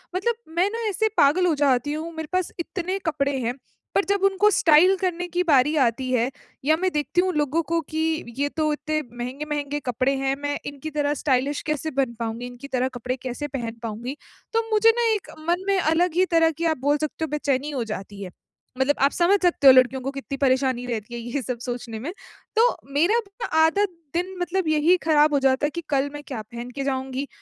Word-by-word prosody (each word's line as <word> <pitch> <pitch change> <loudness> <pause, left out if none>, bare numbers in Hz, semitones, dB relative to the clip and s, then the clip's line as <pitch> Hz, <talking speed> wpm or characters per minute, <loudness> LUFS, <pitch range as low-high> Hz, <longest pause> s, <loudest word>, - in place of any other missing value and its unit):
मतलब 455 +6 0 0.2
मैं 365 +3 +3
ना 455 +1 -3
ऐसे 440 +3 +1
पागल 330 +4 +4
हो 335 - +3
जाती 280 0 +2
हूँ, 320 +2 -4
मेरे 320 -1 -5
पास 370 -1 0
इतने 365 +2 -3
कपडे 280 -3 0
हैं 240 +2 -1 0.4
पर 395 - +4
जब 400 -1 +2
उनको 390 +2 +4
स्टाइल 345 +2 +5
करने 355 -1 -1
की 355 +1 0
बारी 295 -2 +4
आती 255 +2 -1
है, 245 0 +2 0.4
या 310 - +5
मैं 370 +2 0
देखती 300 +4 +1
हूँ 370 0 0
लोगों 300 +2 +1
को 335 - +3
कि 315 - -3 0.4
ये 285 +1 0
तो 310 -1 +2
इतने 310 +1 -2 0.2
महँगे-महँगे 290 +3 -3
कपड़े 255 +2 +1
हैं 270 0 0
मैं 290 0 -1
इनकी 285 +2 -6
तरह 290 -1 0
स्टाइलिश 275 +1 +1
कैसे 305 +1 -1
बन 265 -3 0
पाऊँगी, 230 +1 -3
इनकी 245 +3 -10
तरह 255 -2 0
कपड़े 250 +1 -3
कैसे 260 +3 -4
पहन 245 -5 -4
पाऊँगी? 235 +5 -4 0.4
तो 455 0 0
मुझे 430 +1 +6
ना 475 - +2
एक 405 - -6 0.2
मन 350 +2 +1
में 395 -1 +3
अलग 335 +1 +2
ही 370 - +4
तरह 325 0 +5
की 335 - -2
आप 320 -1 +1
बोल 290 +2 +2
सकते 310 +1 -3
हो - - -6
बेचैनी 290 -1 -1
हो 265 -5 -2
जाती 205 -2 -7
है। 185 - -6 0.5
मतलब 265 +2 +2
आप 280 +1 +4
समझ 370 +3 +3
सकते 345 -6 +3
हो 265 - +11
लड़कियों 255 +1 +4
को 270 +2 -3
कितनी 275 0 -6
परेशानी 260 -2 +1
रहती 235 -1 -4
है 240 - -4
ये 240 +4 -3
सब 250 -1 -4
सोचने 240 -2 -5
में। 280 +9 -4 0.4
तो 460 +2 +5 0.2
मेरा 340 +10 +3 0.3
ना - - 0 0.2
आधा 400 +6 +2 0.3
दिन 360 +3 -2
मतलब 355 0 -1
यही 310 +3 +4
खराब 305 -1 +4
हो 285 - +4
जाता 270 +1 +2
है - - +1
कि 340 - -5
कल 275 0 +1
मैं 290 - -6
क्या 250 -5 -4
पहन 235 +3 -8
के 275 - -2
जाऊँगी? 265 0 -2
290 Hz, 215 wpm, -24 LUFS, 260-340 Hz, 0.5 s, हो